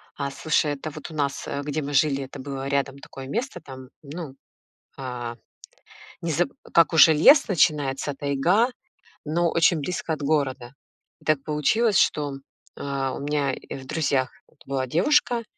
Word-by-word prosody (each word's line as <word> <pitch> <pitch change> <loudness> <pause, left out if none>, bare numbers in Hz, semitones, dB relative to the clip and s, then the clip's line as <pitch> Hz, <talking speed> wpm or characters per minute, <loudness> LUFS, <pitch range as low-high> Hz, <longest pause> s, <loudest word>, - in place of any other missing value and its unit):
А, 140 -1 -3
слушай, 150 +1 +1
это 145 +2 -6
вот 155 +2 -9
у - - -9
нас, 140 -2 -2
э, 140 - -3
где 150 +1 -2
мы 145 0 -5
жили, 140 -1 +2
это 135 +1 -10
было 135 0 -5
рядом 140 0 -1
такое 135 -1 -10
место, 225 - -3
там, 130 -2 -11
ну, 150 -1 -8 0.6
а, 125 -3 -5 0.9
незаб 170 +1 +1 0.3
как 170 0 +5
уже 160 0 +8
лес 275 - +6
начинается, 145 -6 +1
тайга, 145 - +2 0.6
но 170 +2 +1
очень 165 0 +3
близко 165 +1 -3
от 155 - -5
города. 140 -4 -1 0.5
И - - -22
так 155 -3 +1
получилось, 190 +9 +2
что, 145 -2 +2 0.4
э, - - -8
у 135 -1 -2
меня 145 -1 0
и - - -8
в 135 - -9
друзьях 135 -4 0 0.3
была 135 -1 -2
девушка, 235 - +2
145 Hz, 160 wpm, -24 LUFS, 135-160 Hz, 0.9 s, уже